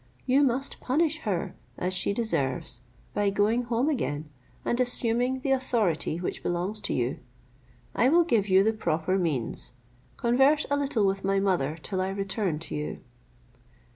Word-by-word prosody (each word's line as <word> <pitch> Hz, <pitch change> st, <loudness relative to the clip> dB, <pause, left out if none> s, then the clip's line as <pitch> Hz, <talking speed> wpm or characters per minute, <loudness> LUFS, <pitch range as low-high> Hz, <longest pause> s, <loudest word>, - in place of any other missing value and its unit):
You 265 Hz, +2 st, +4 dB
must 270 Hz, 0 st, 0 dB
punish 305 Hz, +3 st, +1 dB
her 180 Hz, -4 st, -2 dB, 0.2 s
as 180 Hz, +1 st, -1 dB
she 185 Hz, -, +2 dB
deserves, 140 Hz, -, -1 dB, 0.3 s
by 205 Hz, -1 st, +1 dB
going 215 Hz, +5 st, +1 dB
home 235 Hz, +3 st, 0 dB
again, 150 Hz, -, -2 dB, 0.3 s
and 240 Hz, -, 0 dB
assuming 245 Hz, +1 st, +1 dB
the 275 Hz, -, -1 dB
authority 225 Hz, -12 st, +1 dB
which 175 Hz, -, -4 dB
belongs 180 Hz, +5 st, -2 dB
to -, -, -2 dB
you. 125 Hz, +1 st, -1 dB, 0.7 s
I 250 Hz, -, +3 dB
will 340 Hz, +4 st, +5 dB
give 225 Hz, -, +1 dB
you 190 Hz, +1 st, +6 dB
the 220 Hz, +2 st, +2 dB
proper 180 Hz, -2 st, 0 dB
means. 145 Hz, -12 st, -2 dB, 0.4 s
Converse 270 Hz, +6 st, +3 dB
a -, -, +4 dB
little 270 Hz, -7 st, +1 dB
with 195 Hz, 0 st, 0 dB
my 195 Hz, 0 st, +2 dB
mother 175 Hz, -6 st, 0 dB
till 190 Hz, -2 st, -2 dB
I 190 Hz, -, -1 dB
return 195 Hz, -3 st, -1 dB
to -, -, -7 dB
you." 150 Hz, 0 st, -4 dB
205 Hz, 160 wpm, -27 LUFS, 175-250 Hz, 0.7 s, you